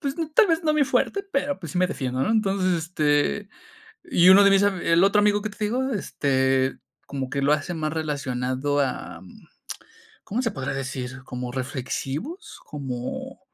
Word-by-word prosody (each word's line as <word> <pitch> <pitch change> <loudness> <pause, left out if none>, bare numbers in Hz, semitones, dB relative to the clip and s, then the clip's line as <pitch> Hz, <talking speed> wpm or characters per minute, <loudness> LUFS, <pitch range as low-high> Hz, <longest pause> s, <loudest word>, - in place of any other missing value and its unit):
pues 280 -2 -3
ni 325 -2 -2
tal 420 +8 +5
vez 330 -1 +1
no 305 -1 +2
mi 300 -2 +4
fuerte, 395 +8 0
pero, 280 0 0
pues, 165 -6 -8
sí - - -1
me 185 - +4
defiendo, 130 -7 -2
¿no? - - 0
Entonces, 195 -4 +1
este, 160 +3 0 0.6
y 180 - +4
uno 200 +2 +8
de 200 - +6
mis 195 0 +5
el 185 -3 +3
otro 200 +1 +4
amigo 205 0 +2
que 215 - -3
te 210 - -9
digo, 255 +5 0
este, 135 - 0 0.3
como 135 -2 -4
que 140 0 -2
lo 140 +2 +3
hace 155 +3 -1
más 155 -2 -2
relacionado 145 -2 -1
am, 95 -10 -4 1.0
¿cómo 225 +5 -2
se 230 - 0
podría 135 -4 -4
decir? 130 -1 -5
¿Como 125 -1 -6
reflexivos? 135 - -5
Como, 130 -4 -6
160 Hz, 175 wpm, -24 LUFS, 135-210 Hz, 1.0 s, uno